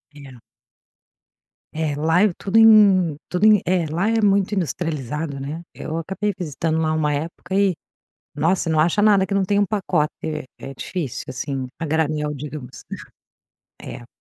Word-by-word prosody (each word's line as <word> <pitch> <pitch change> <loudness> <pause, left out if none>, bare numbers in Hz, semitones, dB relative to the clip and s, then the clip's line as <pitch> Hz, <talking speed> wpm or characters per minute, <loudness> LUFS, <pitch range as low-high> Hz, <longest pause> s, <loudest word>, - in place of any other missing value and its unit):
É. 135 -4 -13 1.3
É, 155 -2 -2
lá 160 +5 +2
é 210 -4 +3
tudo 200 +3 0
em 200 -7 +6
tudo 180 +4 +1
em 215 -3 +6
é, 175 -2 +1
lá 175 +8 0
é 225 0 +2
muito 200 0 +2
industrializado, 155 - -3
né. 145 +5 -5
Eu 160 +1 -5
acabei 195 +4 -2
visitando 160 -1 -2
lá 155 - +1
uma 155 -2 0
época 165 +5 -4
e, 195 -2 +3 0.6
nossa, 165 +3 0
não 155 -1 +2
acha 170 +6 +2
nada 200 -2 +4
que 195 - -3
não 195 -1 +2
tem 205 +2 +1
um 205 - +3
pacote. 185 -7 0 0.5
É 135 - -8
difícil, 155 -2 -5
assim, 130 0 -4
a 165 - -4
granel, 150 -1 -1
digamos, 145 -2 -8 1.0
é. 120 - -9
165 Hz, 155 wpm, -21 LUFS, 150-195 Hz, 1.3 s, em